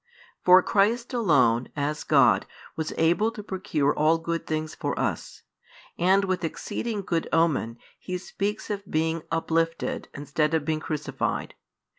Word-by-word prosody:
For 185 0 +7
Christ 230 +5 +1
alone, 130 - +3
as 150 +1 -2
God, - - +4 0.3
was 160 -1 -3
able 175 +7 +3
to 210 - -8
procure 185 -8 0
all 155 +2 +3
good 165 0 -4
things 155 0 -2
for - - -3
us. - - -3 0.5
And 190 +3 +3
with 185 -2 -1
exceeding 205 +5 -3
good 170 -3 -1
omen, 155 -8 +1 0.2
He 185 -1 -4
speaks 205 +4 -4
of 200 -2 -5
being 160 +1 0
"uplifted" 165 0 -1
instead 150 +2 0
of 155 -2 -1
being 155 -1 0
"crucified." 155 -1 -3
165 Hz, 140 wpm, -26 LUFS, 155-190 Hz, 0.5 s, For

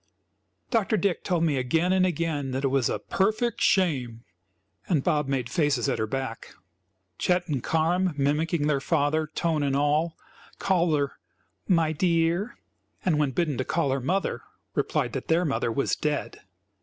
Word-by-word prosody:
Dr. 220 -2 +2
Dick 195 -2 0
told 175 -2 0
me 150 -4 +2
again 160 +8 +1
and 185 -1 +3
again 160 -5 -2
that 135 +1 -2
it 135 - +2
was 135 -2 +1
"a - - -1
perfect 220 +5 0
shame!" 130 - +1 0.7
and 155 -7 +2
Bob 150 -4 +1
made 135 -3 -1
faces 140 - +1
at - - 0
her 110 - 0
back. 130 -1 -5 0.6
Chet 180 0 +1
and 140 -6 -1
Carm 170 +3 +1
mimicking 150 +3 +1
their 145 -2 +1
father, 155 +1 +1
tone 160 0 -1
and 140 -1 0
all 150 +3 +1 0.4
called 175 -5 +2
her 140 -1 -2 0.5
"my 165 -4 +3
dear;" 170 +5 +1 0.5
and, 160 -5 +2
when 150 -2 +2
bidden 150 -1 -1
to - - +1
call 155 -1 0
her 135 0 -1
mother, 185 +9 -1 0.3
replied - - -1
that - - -4
their 170 +2 +2
mother 135 -5 0
was 135 +5 0
dead. 150 -1 -2
155 Hz, 165 wpm, -26 LUFS, 140-175 Hz, 0.7 s, and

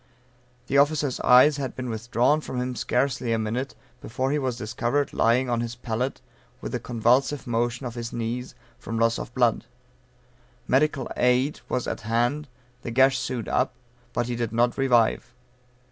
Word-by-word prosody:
The 140 - +2
officer's 145 -2 +2
eyes 130 +4 +6
had 135 -3 -4
been 130 -1 -5
withdrawn 120 +6 +1
from 130 - -5
him 125 0 -3
scarcely 125 +1 0
a - - +1
minute, 115 +5 -3 0.3
before 130 +3 -2
he 150 - +1
was 130 -4 -2
discovered 120 +6 -1
lying 120 +3 +2
on 120 -1 0
his 120 0 -4
pallet, 120 +2 -3 0.4
with - - -6
a - - -1
convulsive 125 +4 +1
motion 120 +2 -1
of 120 - -4
his 115 -1 -5
knees, 120 +2 -4 0.2
from 115 - -5
loss 115 0 +2
of - - -6
blood. 120 -4 +2 1.0
Medical 140 0 +2
aid 125 +4 +2
was 125 - -1
at - - -4
hand, 120 +7 0 0.3
the - - -5
gash 130 +2 +4
sewed 125 -4 -3
up, 130 - 0 0.4
but 120 - -1
he 120 0 -3
did 115 -2 -2
not 120 +1 +2
revive. 125 -2 +2
125 Hz, 165 wpm, -25 LUFS, 115-130 Hz, 1.0 s, eyes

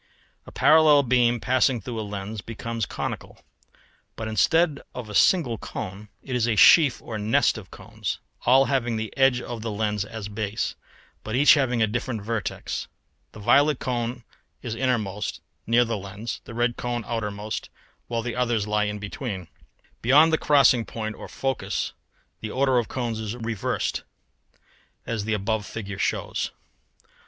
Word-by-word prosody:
] - - -39
A - - -10
parallel 155 -2 +6
beam 120 -1 +3
passing 130 +1 +2
through 115 +2 -5
a - - -1
lens 105 0 -5
becomes 115 0 -4
conical; - - -5 0.8
but 110 - -5
instead 140 - +2
of 120 -3 -6
a - - -7
single 125 - +3
cone 105 0 -7
it 130 - -4
is 120 -1 +1
a 115 - +1
sheaf 140 - +6
or 110 -2 -5
nest 105 +2 +2
of - - -9
cones, - - -5 0.3
all 135 +2 +6
having 120 -4 0
the 110 -1 -4
edge 135 -2 +4
of 120 -2 -6
the 115 - -3
lens 105 -1 -1
as 105 -1 -7
base, 105 0 -3 0.5
but 110 - -3
each 145 +3 +7
having 125 -6 +2
a - - +5
different 120 0 -3
vertex. 110 -1 -3 0.5
The - - -11
violet 145 +7 +4
cone 120 -1 -3 0.4
is 115 - -3
innermost, 110 -5 -1 0.3
near 120 +2 +4
the 115 -1 -2
lens, 100 +4 -6
the 115 - -9
red 120 0 0
cone 120 -1 -2
outermost, 105 -2 -4 0.4
while 115 -1 -2
the 120 0 -3
others 120 -4 +1
lie 105 0 0
between. 100 - -5 0.5
Beyond 150 +7 +6
the 160 - +3
crossing 140 -5 +5
point 110 -1 -5
or - - -9
focus 135 -3 -2 0.5
the 110 - -5
order 130 +1 +2
of 115 - -2
cones 120 -4 -3
is 110 +1 -4
reversed, 115 -4 -2 1.0
as 110 -3 -3
the 110 0 0
above 105 +1 -1
figure 100 -3 -6
shows. - - -1
115 Hz, 160 wpm, -25 LUFS, 105-125 Hz, 1.0 s, each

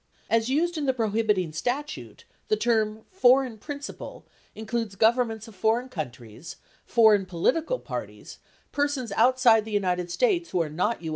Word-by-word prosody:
31 230 - +4
As 225 - -5
used 330 +5 0
in 290 - -2
the 265 - +1
prohibiting 210 -7 0
statute, 270 - -4 0.2
the 430 - +2
term 220 - 0
"foreign 255 - +3
principal," 285 +3 -8 0.3
includes 220 -1 -4
governments 225 0 +1
of 225 - -13
foreign 225 +5 0
countries, 125 - -8 0.3
foreign 215 -5 +4
political 285 - 0
parties, - - -8 0.3
persons 285 -5 -1
outside 235 0 +4
the 220 - -9
United 180 -4 -1
States 350 - +1
who 180 - -1
are 155 - -6
not 175 +5 -1
U. 160 - -4
225 Hz, 150 wpm, -26 LUFS, 200-260 Hz, 0.3 s, 31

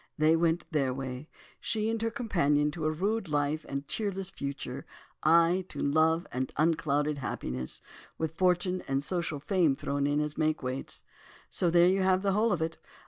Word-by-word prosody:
They 155 +1 +4
went 165 +1 +1
their 135 -5 +1
way. 130 +2 -6 0.3
She 220 -1 -1
and 225 0 -1
her 225 - +1
companion 150 -11 +1
to 160 -1 -4
a 155 - +2
rude 200 +6 -1
life 150 +1 0
and 140 0 -2
a - - -21
cheerless 195 +3 -2
future, 140 -3 -5 0.4
I 170 +3 +4
to - - -7
love 160 +3 +2
and 130 +1 -2
unclouded 150 -2 +1
happiness, 65 - -4 0.3
with 160 -1 -2
fortune 180 +1 +1
and 135 +1 0
social 165 -3 -2
fame 165 -3 +2
thrown 140 +1 -1
in 145 +1 +1
as 150 +1 -2
makeweights. 145 -4 -2 0.5
So 175 - +1
there 175 +1 +5
you 190 +1 +3
have 190 0 +3
the 200 - +2
whole 215 +3 +2
of 170 -4 +1
it. 165 0 -4
160 Hz, 180 wpm, -29 LUFS, 145-185 Hz, 0.5 s, there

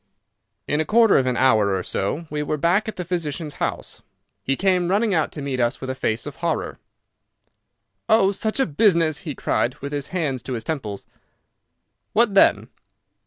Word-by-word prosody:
In 150 +1 +1
a - - +2
quarter 225 +4 +4
of 130 - 0
an 125 - 0
hour 110 -7 +3
or 95 - -2
so 140 - -3
we 150 0 -2
were 150 +1 -2
back 180 +8 +2
at 220 - -4
the 180 - -5
physician's 165 -3 -3
house. - - -3 0.4
He 135 - 0
came 180 +1 +1
running 205 +3 +1
out 160 -3 +1
to 145 - -6
meet 135 -2 -3
us 120 +1 0
with 130 0 -4
a - - -2
face 115 -3 -2
of 145 -2 -8
horror. 170 -1 -2 1.3
"Oh, 215 -3 +5
such 215 +5 -2
a 270 - +3
business!" 165 -2 +2
he 150 -6 -6
cried, 125 +1 -1
with 140 +1 -7
his 145 -2 -3
hands 150 -9 -2
to 130 - -5
his 115 -2 -4
temples. 110 -11 -5 1.1
"What 220 -2 +3
then?" 195 - +4
155 Hz, 185 wpm, -22 LUFS, 130-185 Hz, 1.3 s, Oh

